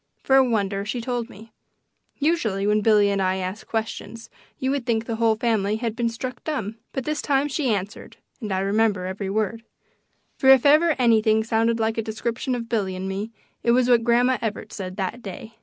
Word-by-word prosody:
For 270 Hz, -, +3 dB
a 270 Hz, -, +7 dB
wonder, 200 Hz, -5 st, 0 dB
she 220 Hz, +4 st, -3 dB
told 240 Hz, 0 st, -3 dB
me; 220 Hz, +2 st, -14 dB, 0.7 s
usually 240 Hz, -, 0 dB
when 210 Hz, +1 st, +2 dB
Billy 210 Hz, -2 st, +4 dB
and 200 Hz, -1 st, 0 dB
I 185 Hz, 0 st, +1 dB
ask 190 Hz, +2 st, -5 dB
questions 225 Hz, 0 st, -5 dB, 0.3 s
you 260 Hz, 0 st, -1 dB
would 280 Hz, -2 st, -1 dB
think 230 Hz, -2 st, 0 dB
the 230 Hz, -1 st, -3 dB
whole 225 Hz, -1 st, +3 dB
family 215 Hz, -3 st, 0 dB
had 225 Hz, 0 st, -3 dB
been 235 Hz, 0 st, 0 dB
struck 250 Hz, +2 st, -6 dB
dumb. 225 Hz, -8 st, -3 dB
But 265 Hz, -, -3 dB
this 305 Hz, 0 st, -1 dB
time 280 Hz, 0 st, +1 dB
she 280 Hz, -3 st, -1 dB
answered 205 Hz, 0 st, -4 dB, 0.2 s
and 215 Hz, -5 st, -5 dB
I 190 Hz, 0 st, 0 dB
remember 200 Hz, -1 st, +1 dB
every 190 Hz, +1 st, -4 dB
word 215 Hz, +2 st, -1 dB, 0.8 s
for 265 Hz, -, +4 dB
if 265 Hz, -1 st, +7 dB
ever 310 Hz, +2 st, +5 dB
anything 220 Hz, -3 st, +3 dB
sounded 230 Hz, +1 st, +1 dB
like 225 Hz, 0 st, 0 dB
a -, -, +2 dB
description 235 Hz, +3 st, -3 dB
of 235 Hz, -1 st, -5 dB
Billy 200 Hz, -5 st, -1 dB
and 185 Hz, +1 st, -4 dB
me 195 Hz, +3 st, -3 dB, 0.3 s
it 235 Hz, -, +3 dB
was 250 Hz, 0 st, +3 dB
what 235 Hz, -2 st, +4 dB
Grandma 245 Hz, +2 st, +3 dB
Evarts 220 Hz, -2 st, -4 dB
said 185 Hz, -1 st, -6 dB
that 205 Hz, +5 st, -3 dB
day. 220 Hz, +2 st, -9 dB
225 Hz, 205 wpm, -23 LUFS, 205-245 Hz, 0.8 s, a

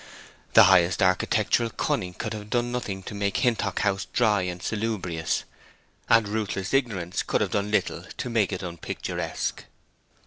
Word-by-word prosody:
The -, -, +10 dB
highest 90 Hz, +2 st, +5 dB
architectural 95 Hz, +5 st, +2 dB
cunning 90 Hz, -4 st, -2 dB
could 110 Hz, -2 st, -4 dB
have 105 Hz, -1 st, -7 dB
done 120 Hz, +1 st, 0 dB
nothing 100 Hz, -6 st, -4 dB
to -, -, -7 dB
make 100 Hz, -1 st, -1 dB
Hintock 110 Hz, -5 st, +1 dB
House 100 Hz, -1 st, 0 dB
dry 110 Hz, -5 st, +3 dB
and 90 Hz, -1 st, -3 dB
salubrious; 95 Hz, -6 st, -2 dB, 0.7 s
and 115 Hz, -2 st, +5 dB
ruthless 105 Hz, -1 st, -3 dB
ignorance 100 Hz, -10 st, 0 dB
could -, -, 0 dB
have -, -, 0 dB
done 100 Hz, 0 st, 0 dB
little 105 Hz, -, 0 dB
to -, -, -3 dB
make 110 Hz, -4 st, +2 dB
it 95 Hz, 0 st, -4 dB
unpicturesque. 85 Hz, -3 st, -4 dB
100 Hz, 150 wpm, -26 LUFS, 95-110 Hz, 0.7 s, The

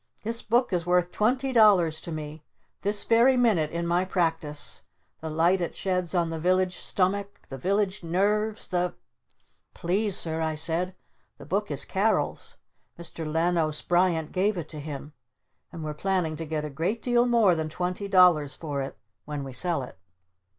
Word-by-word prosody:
"This 230 Hz, +2 st, -1 dB
book 235 Hz, -1 st, +1 dB
is 175 Hz, -1 st, +1 dB
worth 180 Hz, 0 st, +1 dB
twenty 255 Hz, +5 st, 0 dB
dollars 185 Hz, -9 st, +5 dB
to 170 Hz, -, -7 dB
me 155 Hz, 0 st, -6 dB, 0.4 s
this 205 Hz, +1 st, +2 dB
very 240 Hz, +3 st, +4 dB
minute 210 Hz, -11 st, +3 dB
in 170 Hz, +1 st, -3 dB
my 175 Hz, +2 st, +2 dB
Practice! 165 Hz, -5 st, -2 dB, 0.4 s
The 160 Hz, -, -5 dB
light 170 Hz, +4 st, +2 dB
it 170 Hz, -, -3 dB
sheds 180 Hz, -2 st, -1 dB
on 170 Hz, -2 st, +1 dB
the 165 Hz, -, -4 dB
Village 185 Hz, +2 st, +2 dB
Stomach, 200 Hz, +2 st, -1 dB
the 135 Hz, -, -6 dB
Village 200 Hz, +4 st, 0 dB
Nerves, 210 Hz, +5 st, 0 dB
the 180 Hz, -1 st, -1 dB, 0.4 s
" -, -, -44 dB
"Please, 195 Hz, +3 st, +1 dB
Sir," 160 Hz, -1 st, +1 dB
I 160 Hz, -1 st, -1 dB
said. 165 Hz, +4 st, 0 dB, 0.4 s
"The -, -, -12 dB
Book -, -, -1 dB
is -, -, -2 dB
Carol's. -, -, -1 dB, 0.4 s
Mr. 165 Hz, -2 st, -4 dB
Lanos 160 Hz, -2 st, 0 dB
Bryant 175 Hz, -3 st, +1 dB
gave 195 Hz, +2 st, +1 dB
it 160 Hz, -3 st, -5 dB
to 155 Hz, -, -8 dB
him. 145 Hz, 0 st, -7 dB, 0.6 s
And 165 Hz, -, -7 dB
we're 155 Hz, -1 st, -3 dB
planning 175 Hz, -1 st, -1 dB
to 165 Hz, -, -5 dB
get 155 Hz, -1 st, -2 dB
a 150 Hz, -, -6 dB
great 180 Hz, +11 st, -2 dB
deal 240 Hz, 0 st, +3 dB
more 230 Hz, -6 st, +4 dB
than 160 Hz, -1 st, -2 dB
twenty 180 Hz, +4 st, -3 dB
dollars 180 Hz, -7 st, +5 dB
for 145 Hz, -4 st, -4 dB
it 135 Hz, -, -6 dB, 0.3 s
when 150 Hz, -2 st, -4 dB
we 135 Hz, -1 st, -7 dB
sell 170 Hz, 0 st, -1 dB
it!" 110 Hz, -7 st, -11 dB
175 Hz, 175 wpm, -26 LUFS, 160-195 Hz, 0.6 s, dollars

